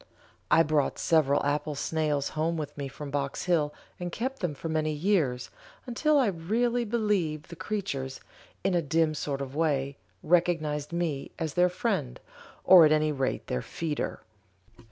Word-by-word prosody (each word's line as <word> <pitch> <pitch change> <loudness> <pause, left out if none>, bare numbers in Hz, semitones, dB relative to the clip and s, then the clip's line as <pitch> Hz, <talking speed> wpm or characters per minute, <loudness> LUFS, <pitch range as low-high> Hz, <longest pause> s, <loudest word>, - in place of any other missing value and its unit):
I 165 - +6
brought 150 -3 +1
several 145 -4 +2
apple 150 +1 -1
snails 150 -1 0
home 165 +2 -1
with 150 -2 -5
me 140 -1 -4
from 140 +1 -8
Box 140 -1 -2
Hill 160 -5 +2 0.3
and 175 -1 -4
kept 260 +8 -3
them 170 -6 -2
for 150 - -6
many 155 -1 0
years, 150 -6 0 0.3
until 295 +5 +2
I 270 - +4
really 225 +7 0
believe 205 -10 0
the 170 - -8
creatures, 170 -9 -4 0.4
in 190 0 +1
a 175 - +3
dim 160 +1 +1
sort 140 -2 -3
of 135 0 -6
way, 140 -3 0 0.3
recognized 155 -4 +1
me 170 -5 -2
as 160 -3 -3
their 180 0 +4
friend, 180 - -2 0.4
or 185 -3 +9
at 155 - +5
any 155 0 +3
rate 135 -3 -2
their 65 - -2
feeder. 155 - -4
155 Hz, 160 wpm, -28 LUFS, 145-180 Hz, 0.4 s, or